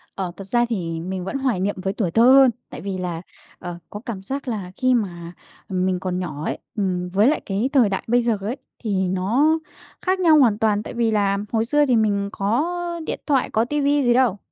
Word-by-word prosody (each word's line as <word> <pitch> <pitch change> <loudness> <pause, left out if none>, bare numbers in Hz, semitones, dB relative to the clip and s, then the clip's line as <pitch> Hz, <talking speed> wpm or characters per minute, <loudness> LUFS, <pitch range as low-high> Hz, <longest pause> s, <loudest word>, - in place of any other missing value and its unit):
Ờ, 185 -3 -3
thật 195 -1 -9
ra 240 +3 +2
thì 170 -8 -3
mình 185 +1 -4
vẫn 275 - -3
hoài 255 -8 0
niệm 200 +2 -1
với 195 +1 -2
tuổi 185 -7 -1
thơ 225 +6 +4
hơn, 265 0 +7 0.2
tại - - -8
vì 195 -1 -4
là, 175 -2 -4 0.4
ờ, 175 -1 -6
có 205 - -7
cảm 205 -5 -5
giác 270 +6 -5
là 200 -6 -4
khi 255 -1 +2
mà 175 -6 -2 0.4
mình 185 -1 0
còn 185 -1 -2
nhỏ 155 -4 -5
ấy, - - -2 0.2
ừm 180 -4 -1
với 200 +5 +3
lại 300 - +2
cái 210 +7 -1
thời 245 -7 +5
đại 190 - -2
bây 240 +1 +3
giờ 230 -3 +1
ấy 220 +7 -3 0.3
thì 190 -4 0
nó 240 - +2 0.4
khác 375 0 0
nhau 325 -4 +5
hoàn 230 -7 +4
toàn. 215 -2 +1
Tại - - -7
vì 230 -1 +1
là 200 -2 +2
hồi 225 -1 +1
xưa 295 +4 +3
thì 250 -3 +2
mình 205 -2 +1
có 220 +9 0 0.4
điện - - -3
thoại, 275 -4 +2
có 220 +1 +1
ti 295 +3 -1
vi 285 0 +2
gì 240 -1 +4
đâu, 240 -5 +3
210 Hz, 230 wpm, -22 LUFS, 190-250 Hz, 0.4 s, hơn